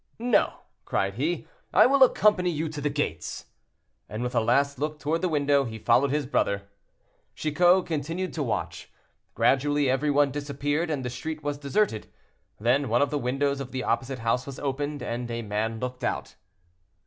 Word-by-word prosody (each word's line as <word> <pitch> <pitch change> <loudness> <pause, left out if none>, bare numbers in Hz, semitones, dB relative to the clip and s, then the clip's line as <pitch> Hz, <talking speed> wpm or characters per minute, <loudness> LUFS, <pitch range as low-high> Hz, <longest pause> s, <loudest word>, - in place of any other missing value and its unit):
"No!" 235 -1 +2 0.3
cried 95 0 -1
he. 150 - -2 0.2
"I - - +7
will 275 +2 +3
accompany 210 -7 +5
you 160 -1 -2
to 150 -1 -6
the 145 - 0
gates," 140 - -3 0.6
and 110 +4 -4
with 125 - -3
a - - +3
last 140 +4 +2
look 150 +1 -2
toward 155 +3 -1
the 185 - +1
window, 145 -2 +2
he 115 -3 -6
followed 120 +5 +3
his 145 +1 0
brother. 100 -6 0 0.7
Chicot 175 +4 +3
continued 165 +3 -3
to 160 - -3
watch. 110 -8 -3 0.4
Gradually 145 0 +2
every 140 +3 +1
one 145 -1 +3
disappeared, 145 +3 -2
and 140 -5 -2
the 125 - -3
street 155 +4 -5
was 145 0 -2
deserted. 145 - 0 0.5
Then 125 +4 +2
one 120 +5 +3
of 145 - -2
the 145 - 0
windows 140 +2 0
of 135 -2 -6
the 130 -1 -3
opposite 130 0 -1
house 125 +3 +1
was 135 - -7
opened, 145 +1 -3
and 120 +1 -4
a 115 0 -3
man 110 +2 -2
looked 125 +1 -5
out. - - -2
140 Hz, 180 wpm, -26 LUFS, 125-150 Hz, 0.7 s, I